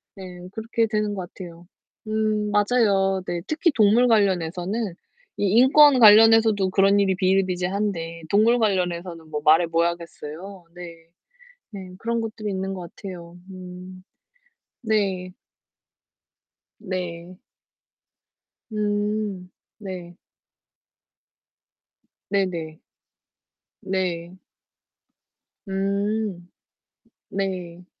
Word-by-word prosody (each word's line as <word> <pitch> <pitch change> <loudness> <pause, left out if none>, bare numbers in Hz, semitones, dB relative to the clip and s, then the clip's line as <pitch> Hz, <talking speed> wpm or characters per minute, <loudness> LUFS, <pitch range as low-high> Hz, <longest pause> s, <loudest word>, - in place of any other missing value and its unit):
네 180 -2 -10
그렇게 225 +1 -1
되는 210 -1 -1
것 185 -3 -6
같아요. 175 -2 -11 0.4
음 215 -1 0
맞아요. 205 -3 +2
네. 175 -1 -3
특히 315 +2 +1
동물 225 0 +4
관련해서는 195 -1 0 0.4
이 - - 0
인권 275 +2 +7
관련해서도 220 -2 +6
그런 195 +1 +3
일이 195 -2 +2
비일비재한데 185 -2 -1
동물 225 +4 +4
관련해서는 175 -5 -2
뭐 150 -1 -3
말해 160 +3 +5
뭐 165 0 +1
하겠어요. 170 +2 -6
네. 165 -2 -11 0.7
네. 190 -3 -8
그런 230 +2 -2
것들이 215 -1 -5
있는 190 0 -3
것 180 -3 -7
같아요. 175 -3 -9
음. 185 0 -10 0.8
네. 195 -5 -1 1.5
네. 180 -2 -6 1.3
음 210 -2 -2 0.3
네. 185 -4 -8 2.1
네네. 170 -6 -2 1.0
네. 180 -2 -3 1.3
음. 200 -1 -2 0.8
네. 180 -3 -4
190 Hz, 170 characters per minute, -23 LUFS, 175-210 Hz, 2.1 s, 인권